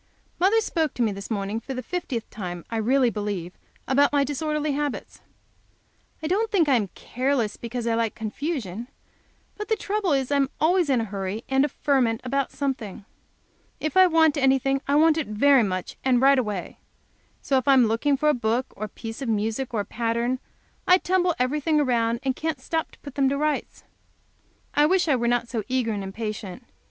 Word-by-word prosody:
Mother 400 +5 +4
spoke 320 -8 -1
to 245 - +1
me 220 - +1
this 200 0 -7
morning 205 0 -2
for 265 +4 -7
the 255 - -4
fiftieth 255 -6 -4
time, 175 -4 -6
I 225 - -1
really 245 +2 +3
believe, 200 -5 -4 0.3
about 280 +2 +4
my 285 -1 +3
disorderly 300 +2 -1
habits. 290 0 -4 1.0
I - - -1
don't 420 +6 +1
think 355 -7 +2
I 280 - +4
am 220 -5 +2
careless 250 -3 -1
because 235 0 -5
I 230 - +1
like 225 -1 0
confusion, 230 - -4 0.7
but 420 - -5
the 440 - +2
trouble 410 -3 -1
is 270 -1 0
I 285 - +3
am 275 -1 +2
always 345 0 +3
in 255 -4 +3
a - - -2
hurry 200 +1 -4
and 270 0 +3
a 295 - +1
ferment 255 -5 +1
about 275 +1 -1
something. 250 -8 -4 0.7
If 310 -2 -3
I 375 0 +7
want 320 -3 +4
anything, 270 0 +2
I 280 - +2
want 320 +1 +5
it 315 - -3
very 260 +6 +4
much, 185 -4 -3
and 255 -2 +3
right 270 +1 +5
away. 210 -7 -4 0.6
So 270 - +2
if 260 - -1
I 275 - +7
am 255 -2 +6
looking 230 +6 +1
for 300 - 0
a - - +4
book, 240 +1 -1
or 215 - -4
a - - -9
piece 225 +4 -8
of 260 - -3
music, 225 +4 -1
or 220 -3 0
a - - -6
pattern, 235 +2 -1 0.5
I 365 - +7
tumble 360 -2 +1
everything 300 +4 +1
around, 235 -4 +1
and 265 -2 0
can't 315 -3 -3
stop 320 +4 -2
to - - -18
put 285 - -9
them 270 -1 +2
to 280 - -1
rights. 300 +1 -2 0.9
I 295 +1 +4
wish 365 0 +2
I 290 - +4
were 240 -1 0
not 240 0 +1
so 230 -2 -2
eager 255 -3 0
and 205 -2 -3
impatient. 210 +1 -6
260 Hz, 205 wpm, -25 LUFS, 225-295 Hz, 1.0 s, I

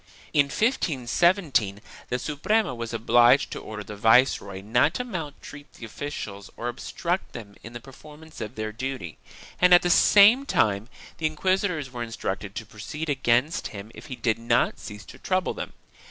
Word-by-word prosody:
In 145 - +5
1517 150 - +1 0.3
the 125 - 0
Suprema 150 - 0
was 115 -1 -5
obliged 120 +3 +4
to - - -5
order 105 -1 -7
the 105 - -9
viceroy 110 -3 +3
not 115 - +2
to 250 - -1
maltreat 150 - -8
the 115 - -10
officials 105 -5 -7
or 120 - -3
obstruct 175 +8 -3
them 100 -4 -9
in 115 - -11
the 120 - -6
performance 150 +5 -13
of 110 +3 -6
their 110 0 -4
duty, 115 -7 -6 0.4
and 180 0 +8
at 175 - +4
the 175 - +2
same 215 +10 +6
time, 105 +1 +1 0.3
the 160 - +1
inquis 185 +5 +1
itors 155 -8 -5
were 120 -1 -6
instructed 100 -4 -4
to 110 - -5
proceed 150 +10 -7
against 135 +2 +1
him 100 +1 -9
if - - -12
he 130 - -6
did 115 -3 0
not 120 +1 +1
cease 105 -2 -9
to - - -13
trouble 185 -1 0
them. - - -6
125 Hz, 170 wpm, -25 LUFS, 110-160 Hz, 0.4 s, and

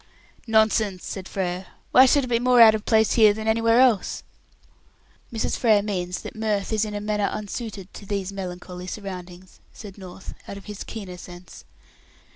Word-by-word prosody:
"Nonsense," 220 -3 +2
said 190 -2 -6
Frere. 185 -1 -3 0.2
"Why 260 +1 +7
should 285 +2 +3
it - - -4
be 235 -1 +1
more 250 0 +4
out 225 -2 +9
of 220 -1 -3
place 220 -2 +3
here 215 -3 +5
than 220 0 -5
anywhere 230 +1 +3
else?" 245 -7 +2 1.1
"Mrs. 225 -2 -1
Frere 215 -4 +3
means 180 -3 -3
that - - -8
mirth 215 -1 -1
is 215 0 +1
in 210 -1 -6
a - - -2
manner 210 0 -1
unsuited 205 -2 -6
to 200 - -11
these 200 -2 -3
melancholy 180 -1 -7
surroundings," 185 -2 -8
said 205 -2 -11
North, 185 0 -10
out 200 - -7
of 200 - -12
his 210 -1 -7
keener 195 -5 -8
sense. 175 0 -12
205 Hz, 175 wpm, -24 LUFS, 185-220 Hz, 1.1 s, out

